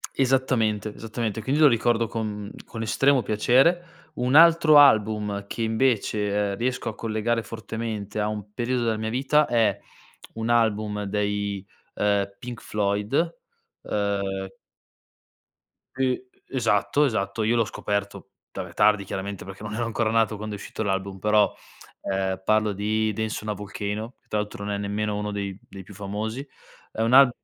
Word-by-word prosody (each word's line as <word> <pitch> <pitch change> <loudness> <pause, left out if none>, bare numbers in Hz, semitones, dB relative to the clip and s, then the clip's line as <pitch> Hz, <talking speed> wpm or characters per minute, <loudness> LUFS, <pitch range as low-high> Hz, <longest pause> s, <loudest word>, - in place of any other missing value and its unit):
Esattamente, 125 -5 +1
esattamente, 110 0 -4
quindi 140 +6 0
lo 150 - +8
ricordo 115 -1 +2
con 105 -3 -4 0.2
con 115 - -6
estremo 135 +4 +3
piacere. 165 +11 +2 0.2
Un 125 +2 0
altro 165 -2 +7
album 105 -6 +4
che 115 - -4
invece, 105 -3 +1
ehm, - - -4
riesco 125 0 -2
a 110 - -4
collegare 115 +1 -1
fortemente 110 -1 -5
a 105 - +1
un 105 -1 -5
periodo 125 +2 -1
della 110 -1 +1
mia 110 0 -3
vita 140 +5 +3
è 110 -4 +2 0.6
un 115 +1 -3
album 105 -3 +1
dei, 100 -1 -2 0.3
ehm, 100 -1 0
Pink 120 +2 -8
Floyd, 105 +11 0 0.5
uhm 100 -2 -2 1.4
Uh, 130 -1 +2 0.3
esatto 125 +3 +2
esatto, 110 -4 -1
io 115 +2 +2
l'ho 115 - +3
scoperto 100 -1 -3 0.2
vabbè - - -6
tardi 105 -2 +4
chiaramente 95 0 -5
perché 95 +2 -10
non 105 0 -5
ero 120 +1 -1
ancora 115 -1 0
nato 115 -1 +2
quando 105 0 -5
è - - -6
uscito 105 - -6
l'album, 95 -1 -2
però, 105 +1 +3 0.5
ehm, 95 -1 -2
parlo 110 0 +2
di 110 +2 0
Dance 110 0 -3
on 110 - -3
a - - +1
Volcano 105 +3 -5
che - - -42
tra 105 - -1
l'altro 105 -1 -4
non 105 - -2
è 100 - -2
nemmeno 105 +1 -2
uno 105 0 -3
dei 100 -2 -4
dei 95 - -9
più 100 - -13
famosi. 110 +7 -4 0.5
È - - -6
un 115 +2 +1
al 135 -1 +8
110 Hz, 160 wpm, -25 LUFS, 100-120 Hz, 1.4 s, lo